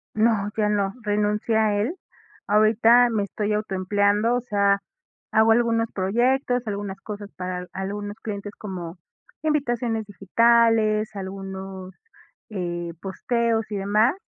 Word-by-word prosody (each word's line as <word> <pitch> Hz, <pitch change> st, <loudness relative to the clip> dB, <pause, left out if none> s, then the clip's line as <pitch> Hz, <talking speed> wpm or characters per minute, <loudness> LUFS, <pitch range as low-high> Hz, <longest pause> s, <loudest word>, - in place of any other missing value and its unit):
No, 215 Hz, -2 st, +2 dB
ya 210 Hz, -1 st, +2 dB
no, 200 Hz, -2 st, 0 dB
renuncié 210 Hz, +1 st, 0 dB
a 215 Hz, -2 st, +2 dB
él. 245 Hz, -, -1 dB, 0.5 s
Ahorita, 225 Hz, +3 st, +5 dB
me 220 Hz, -3 st, 0 dB
estoy 210 Hz, +1 st, -2 dB
auto 210 Hz, -2 st, -2 dB
empleando, 205 Hz, +4 st, +2 dB
o 245 Hz, -, 0 dB
sea, 200 Hz, -3 st, +2 dB, 0.5 s
hago 220 Hz, +1 st, +5 dB
algunos 230 Hz, -1 st, +2 dB
proyectos, 245 Hz, +6 st, +1 dB
algunas 200 Hz, -2 st, -4 dB
cosas 205 Hz, -1 st, -7 dB
para 180 Hz, 0 st, -4 dB
al 180 Hz, 0 st, -8 dB
algunos 205 Hz, +2 st, -5 dB
clientes, 205 Hz, -2 st, -5 dB
como 180 Hz, -4 st, -6 dB, 0.4 s
invitaciones 240 Hz, -8 st, 0 dB
digitales, 220 Hz, +1 st, +3 dB
algunos, 190 Hz, -1 st, -7 dB, 0.6 s
eh, 175 Hz, -4 st, -4 dB
posteos, 225 Hz, +3 st, -1 dB
y 210 Hz, -, -3 dB
demás. 210 Hz, +6 st, +2 dB
210 Hz, 125 wpm, -24 LUFS, 195-225 Hz, 0.6 s, Ahorita